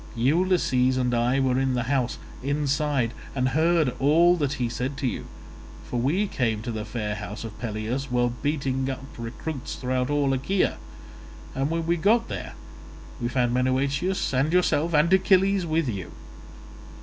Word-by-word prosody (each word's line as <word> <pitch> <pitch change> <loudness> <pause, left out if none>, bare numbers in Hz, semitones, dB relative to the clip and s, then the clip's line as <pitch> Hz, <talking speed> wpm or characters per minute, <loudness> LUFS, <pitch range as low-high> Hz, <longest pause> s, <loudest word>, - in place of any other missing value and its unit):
Ulysses 130 -2 +2
and 125 -1 0
I 120 +3 +2
were 130 -1 +2
in 135 -1 +1
the 120 - 0
house, 130 0 0 0.2
inside, 140 -3 0 0.2
and 130 -1 +1
heard 160 -2 +2
all 165 +6 +5
that 145 -5 -1
he 125 -4 -1
said 125 +4 -3
to 135 - -3
you; - - -4 0.6
for 120 - -3
we 160 - +1
came 115 - -1
to 120 - -3
the 110 -1 -4
fair 105 -1 -3
house 105 +1 -6
of 105 -2 -8
Peleus 115 +4 -3
while 120 -1 +1
beating 135 -3 -1
up 135 0 -5
recruits 125 +5 -5
throughout 125 0 -1
all 145 -2 +2
Achaea, 180 +9 0 0.8
and 135 +2 -1
when 165 0 -1
we 170 +1 +1
got 225 +7 +2
there - - -5 0.7
we 120 - 0
found 120 -1 +1
Menoetius 135 +8 0
and 135 +4 +2
yourself, 170 -2 +2
and 160 +5 +4
Achilles 190 -1 +3
with 160 -1 +1
you. 100 -7 -4
135 Hz, 160 wpm, -25 LUFS, 125-155 Hz, 0.8 s, all